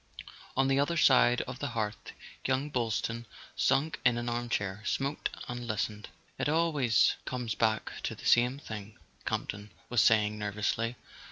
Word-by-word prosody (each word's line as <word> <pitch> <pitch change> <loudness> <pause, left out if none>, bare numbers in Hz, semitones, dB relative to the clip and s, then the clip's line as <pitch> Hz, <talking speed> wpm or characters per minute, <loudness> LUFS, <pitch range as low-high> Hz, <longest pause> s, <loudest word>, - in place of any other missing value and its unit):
On 135 0 +4
the 135 0 +3
other 170 +4 +1
side 125 -4 +5
of 125 0 -7
the 145 - -2
hearth 105 -1 -3 0.3
young 135 +3 0
Boylston, 115 -1 -1 0.3
sunk 150 +3 +1
in 125 -2 +4
an 120 0 -2
armchair, 115 -4 -2
smoked 140 +6 -1 0.2
and 120 0 -5
listened. 105 -1 -2 0.3
"It - - +1
always 150 -7 +3
comes 125 -4 -2
back 110 0 +1
to - - -3
the - - -12
same 125 +2 +4
thing," 110 -6 -8 0.3
Camp - - -1
ton 105 +1 -6 0.2
was 120 -2 +4
saying 105 -1 +4
nervously. 105 +3 -1
120 Hz, 155 wpm, -30 LUFS, 110-135 Hz, 0.3 s, side